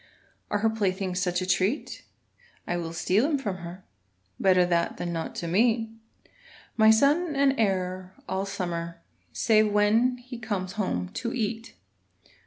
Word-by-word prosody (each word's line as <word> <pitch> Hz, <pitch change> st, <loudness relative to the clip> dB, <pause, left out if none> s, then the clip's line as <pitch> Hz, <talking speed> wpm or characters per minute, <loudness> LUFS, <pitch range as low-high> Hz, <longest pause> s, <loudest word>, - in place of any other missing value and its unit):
Are -, -, +1 dB
her 220 Hz, +2 st, +2 dB
playthings 190 Hz, -3 st, -1 dB
such 180 Hz, 0 st, 0 dB
a -, -, -3 dB
treat? 190 Hz, +8 st, -1 dB, 0.6 s
I 175 Hz, -, -2 dB
will 170 Hz, -2 st, -3 dB
steal 185 Hz, +6 st, +1 dB
'em 300 Hz, -1 st, +1 dB
from 205 Hz, -8 st, -3 dB
her; 175 Hz, +1 st, -9 dB, 0.6 s
Better 185 Hz, -2 st, +4 dB
that 170 Hz, -1 st, 0 dB
than 175 Hz, -1 st, -3 dB
not 165 Hz, -1 st, -4 dB
to 170 Hz, -, -4 dB
meet 225 Hz, +5 st, +2 dB, 0.8 s
My 220 Hz, -1 st, +5 dB
son 290 Hz, +8 st, +3 dB
and 275 Hz, -1 st, +3 dB
heir 185 Hz, -3 st, -1 dB
all 190 Hz, +1 st, -2 dB
summer, 170 Hz, -3 st, -4 dB, 0.3 s
Save 215 Hz, -2 st, +3 dB
when 220 Hz, +5 st, +3 dB
he 245 Hz, 0 st, -10 dB
comes 200 Hz, -5 st, -3 dB
home 180 Hz, -, -2 dB
to 235 Hz, -, -4 dB
eat. 225 Hz, -1 st, -3 dB
195 Hz, 150 wpm, -27 LUFS, 180-225 Hz, 0.8 s, My